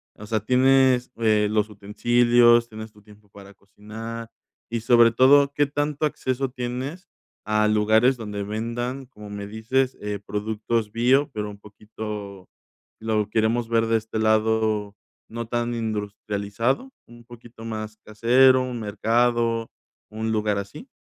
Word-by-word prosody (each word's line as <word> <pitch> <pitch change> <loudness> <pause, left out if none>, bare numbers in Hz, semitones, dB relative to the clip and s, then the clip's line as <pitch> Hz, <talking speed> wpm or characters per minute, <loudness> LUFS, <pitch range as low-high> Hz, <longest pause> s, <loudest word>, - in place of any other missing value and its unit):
O 105 - -11
sea, 110 0 0
¿tienes, 130 +1 +3
eh, 110 -2 +2
los 105 0 0
utensilios, 120 +3 +3
tienes 110 0 -9
tu 105 -1 -20
tiempo 105 0 -19
para 100 0 -14
cocinar?, 110 +3 -9 0.4
y 115 -1 -3
sobre 115 0 +5
todo, 140 +3 +5
¿qué 145 - +3
tanto 145 +1 -2
acceso 130 -2 -2
tienes 130 +9 -5 0.4
a 105 0 +2
lugares 110 +4 +3
donde 105 -2 -5
vendan, 120 +5 -4
como 105 -4 -13
me 100 0 -6
dices, 125 +5 -1
eh, 105 -1 -4
productos 110 +1 -2
bio, 130 +5 +2
pero 105 -1 -4
un 100 - -10
poquito 105 -2 -9 0.5
lo 110 -2 -1
queremos 115 +2 0
ver 115 -1 +2
de 115 - +2
este 110 0 -5
lado, 110 -1 +1 0.3
no 115 0 -6
tan 120 +1 -2
industrializado? 105 - -3 0.2
¿Un 120 0 -15
poquito 120 -1 -14
más 110 -1 -6
casero, 125 +4 +4
un 125 -2 -5
mercado, 115 +2 0 0.4
un 110 +1 -3
lugar 105 -1 0
así? 145 - -8
110 Hz, 140 wpm, -24 LUFS, 105-120 Hz, 0.5 s, sobre